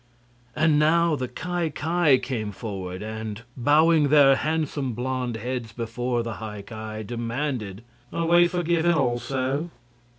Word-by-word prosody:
And 155 -1 +3
now 165 +1 +3
the 130 -2 -3
Ki 175 +6 -3
Ki 155 -2 +2
came 120 -5 -3
forward 95 -3 -6
and, 110 0 -6
bowing 150 +4 +4
their 140 -2 +6
handsome 150 -4 -1
blond 125 0 -2
heads 120 0 -4
before 120 +1 -2
the 115 -2 -5
High 105 -2 -6
Ki, 110 0 -7
demanded: 115 -2 -3 0.3
"Are 170 - -1
we 175 +1 +5
forgiven 170 -1 +1
also?" 135 +3 -1
130 Hz, 130 wpm, -25 LUFS, 115-155 Hz, 0.3 s, their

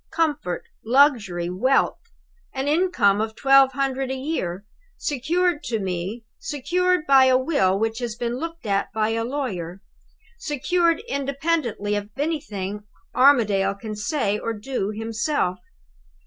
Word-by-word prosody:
Comfort, 295 - -1 0.2
luxury, 225 - +3
wealth! 240 +10 +1 0.6
An 265 +1 -2
income 290 - +3
of 220 0 -3
twelve 270 -1 +5
hundred 270 -1 -1
a 265 - -2
year 210 - -3 0.3
secured 320 +4 0
to 230 - -1
me 190 +3 -4
secured 360 - 0
by 270 -1 +6
a 260 -1 +5
will 255 - +1
which 225 +2 -1
has 240 -3 -4
been 240 0 -3
looked 330 +1 -6
at 200 -1 0
by 220 0 +1
a 225 0 -1
lawyer: 200 - -4 0.6
secured 335 - +1
independently 275 - -1
of 205 0 -2
anything 210 - -3 0.3
Armadale 210 -8 +4
can 215 +1 -7
say 210 -2 -1
or 230 - -3
do 215 -1 -3
himself! 225 - -1
250 Hz, 130 wpm, -23 LUFS, 205-290 Hz, 0.6 s, by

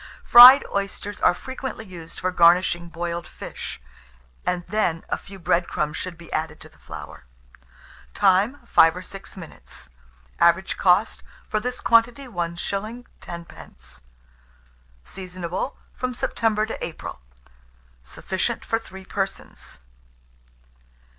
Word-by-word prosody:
Fried 250 +3 +10
oysters 200 +1 -4
are - - +4
frequently 260 -2 -6
used 170 -4 -10
for 185 - -1
garnishing 175 0 +4
boiled 170 0 -4
fish, - - -8 0.7
and 175 -1 -1
then 180 -5 -1
a - - +1
few 195 0 -12
bread 170 0 +1
crumbs 150 0 -2
should 185 -2 -5
be 170 0 -11
added 155 -1 -3
to - - -12
the - - -23
flour. - - -10 0.9
Time. 205 +7 +2
5 165 -7 +5
or 180 - -7
6 195 +1 -11
minutes. 165 - -11 0.5
Average 170 +3 +3
cost 185 +4 +2 0.3
for 215 - 0
this 250 +3 -4
quantity, 235 +4 +3
1s. 195 +5 -4 0.2
10d. 65 - -11 1.0
Seasonable 185 +4 -5 0.2
from 255 -1 -4
September 220 -3 0
to 220 - -6
April. 165 - -7 0.8
Sufficient 190 - -3
for 225 - 0
3 190 -4 -12
persons. 195 - -5
185 Hz, 120 wpm, -23 LUFS, 170-220 Hz, 1.0 s, Fried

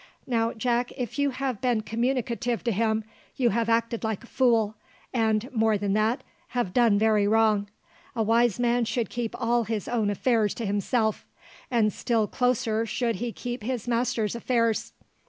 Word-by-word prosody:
Now, 230 -2 +1
Jack, 240 +1 0
if 250 +2 -4
you 285 0 +3
have 260 -4 -3
been 245 -4 +1
communicative 235 +1 -1
to 235 - +1
him, 220 +1 +1 0.3
you 245 -3 +2
have 230 +2 0
acted 230 0 +1
like 220 -1 -2
a - - -11
fool, 230 -4 +2 0.4
and, 220 -1 +1
more 220 -2 +2
than 200 -1 -1
that, 215 +5 +1 0.3
have 200 -7 0
done 230 -3 +4
very 215 -1 +3
wrong. 215 -2 +3 0.5
A 225 - +1
wise 230 0 +2
man 240 0 +2
should 235 0 -2
keep 240 -2 -4
all 235 -1 +1
his 215 -2 -3
own 225 -4 0
affairs 215 0 +1
to 230 - -4
himself; 215 +2 0 0.4
and 225 -4 +2
still 230 -3 +1
closer 230 -2 0
should 235 -2 -1
he 240 +2 -3
keep 245 +1 -5
his 240 0 -3
master's 235 -2 0
affairs. 230 -2 0
230 Hz, 170 wpm, -26 LUFS, 220-245 Hz, 0.5 s, done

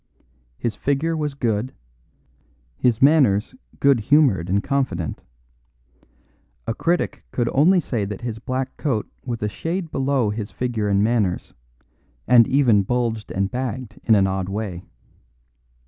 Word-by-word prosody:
His 115 - -2
figure 145 +4 0
was 150 -3 -2
good, 115 -2 -1 1.0
his 120 - +1
manners 135 - +4 0.3
good 140 -3 +4
humoured 110 - +3
and 100 +2 +1
confident; 125 - -2 1.4
a 115 - -1
critic 170 +8 -1
could 120 -2 -1
only 175 +7 +5
say 120 -9 -2
that 100 -1 -6
his 115 -2 -5
black 130 +3 -4
coat 125 -9 -1 0.2
was 120 -4 -4
a - - +1
shade 165 - -4
below 135 -5 +1
his 105 0 -4
figure 120 -5 -2
and 100 0 +2
manners, 105 -5 0 0.7
and 120 -2 +6
even 125 -7 +4
bulged 115 0 -2
and 95 +1 -1
bagged 125 -2 -4
in 110 - +4
an 100 -2 +4
odd 95 -1 -2
way. 100 -3 -4
120 Hz, 135 wpm, -22 LUFS, 105-135 Hz, 1.4 s, and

